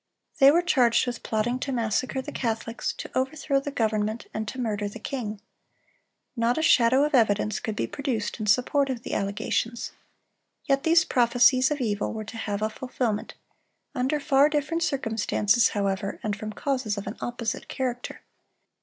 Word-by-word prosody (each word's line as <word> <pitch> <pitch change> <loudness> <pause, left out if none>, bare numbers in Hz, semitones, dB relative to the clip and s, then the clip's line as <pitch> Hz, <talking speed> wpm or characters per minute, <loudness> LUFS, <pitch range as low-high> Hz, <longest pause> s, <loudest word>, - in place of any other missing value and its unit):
They 275 -1 +9
were 340 +4 +4
charged 255 -11 +3
with 245 -1 -4
plotting 235 +3 -1
to 275 - -3
massacre 250 +2 -1
the - - -7
Catholics, 230 -1 -2
to - - -8
overthrow 275 +2 0
the 275 - -5
government, 220 -3 -1
and 220 0 -3
to 260 - -6
murder 210 -4 -1
the 205 - -9
king. 220 -3 -5 1.0
Not 235 0 +1
a 315 - 0
shadow 255 -1 +5
of 300 - -3
evidence 215 -4 +2
could 220 -4 -4
be - - -1
produced 255 -8 -3
in 215 - -3
support 270 +6 +2
of 245 -3 -4
the - - -5
allegations. 220 +3 -2 0.7
Yet 275 -2 +2
these 335 +3 +4
prophecies 250 -1 +4
of 295 -2 -2
evil 205 -4 -1
were 215 -1 -5
to 225 +2 -8
have 210 -2 -3
a 215 - +1
fulfilment; 245 -3 -3 0.6
under 265 +4 0
far 285 0 +4
different 305 +2 -1
circumstances, 225 - +2
however, 200 -1 -2
and 210 -1 -1
from 215 +1 -6
causes 250 -2 -2
of 200 - -5
an 205 - -5
opposite 240 0 -3
character. 245 -2 -4
240 Hz, 170 wpm, -26 LUFS, 215-270 Hz, 1.0 s, They